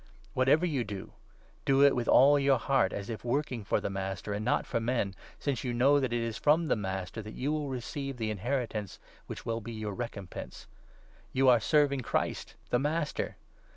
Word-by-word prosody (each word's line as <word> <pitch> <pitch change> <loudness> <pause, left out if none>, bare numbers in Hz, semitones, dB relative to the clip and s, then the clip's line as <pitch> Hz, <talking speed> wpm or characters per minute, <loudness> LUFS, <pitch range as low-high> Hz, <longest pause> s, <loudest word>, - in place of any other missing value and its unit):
Whatever 135 +6 +4
you 145 -8 0
do, 100 -4 -7 0.5
do 135 0 +4
it 140 -1 +6
with 120 -2 -1
all 145 +2 +6
your 140 -1 +4
heart, 130 -9 +2
as 100 -1 -5
if 110 - -5
23 120 - -3
working 130 -5 -1
for - - +1
the - - -3
Master 95 +1 -3
and 105 +1 -3
not 120 - +1
for - - -1
men, 115 -4 0 0.2
since 140 -5 -2
you 125 -2 -2
know 140 +4 +5
that 135 - +1
24 120 0 -1
it 115 0 -1
is 110 - -4
from 155 +3 +4
the - - +4
Master 95 -1 -4
that 110 0 -9
you 140 +4 -1
will 150 -2 -1
receive 135 +1 -4
the 110 -2 -1
inheritance 110 -2 -2 0.3
which - - -7
will 115 0 -2
be 115 +2 -7
your 110 -2 -4
recompense. 100 -4 -7 0.7
You 130 0 +4
are 120 -2 +6
serving 140 +3 +3
Christ, - - -2 0.2
the 120 - +3
Master. 150 +2 -1
120 Hz, 205 wpm, -30 LUFS, 110-140 Hz, 0.7 s, it